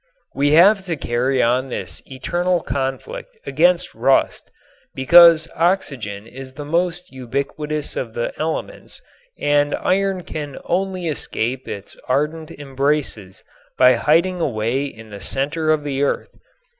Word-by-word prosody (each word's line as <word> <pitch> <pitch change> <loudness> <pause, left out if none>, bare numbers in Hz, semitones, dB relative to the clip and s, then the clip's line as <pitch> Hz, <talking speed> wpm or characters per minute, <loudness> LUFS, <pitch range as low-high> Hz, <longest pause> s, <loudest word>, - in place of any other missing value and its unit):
We 145 +1 +2
have 195 +5 +6
to 170 -3 -2
carry 125 +1 0
on 125 +3 +1
this 90 -9 -4
eternal 175 +7 -1
conflict 300 - -4
against - - +2
rust - - +1 0.5
because 165 +4 +7
oxygen 135 - -1
is 130 +2 -11
the 145 - -7
most 175 +3 -1
ubiquitous 140 +4 -4
of 115 -4 -4
the 120 - -2
elements 160 - -4 0.4
and 145 0 +2
iron 195 -1 0
can 145 -4 -6
only 185 -1 -1
escape 130 -4 -2
its 100 0 -7
ardent 150 +4 -1
embraces 135 -8 -3 0.3
by 125 0 +6
hiding 170 +8 +2
away 125 0 -1
in 110 -5 -10
the 100 -1 -9
center 150 - -1
of 155 -1 +2
the 140 -2 -2
earth. 145 - -1
145 Hz, 130 wpm, -20 LUFS, 130-170 Hz, 0.5 s, because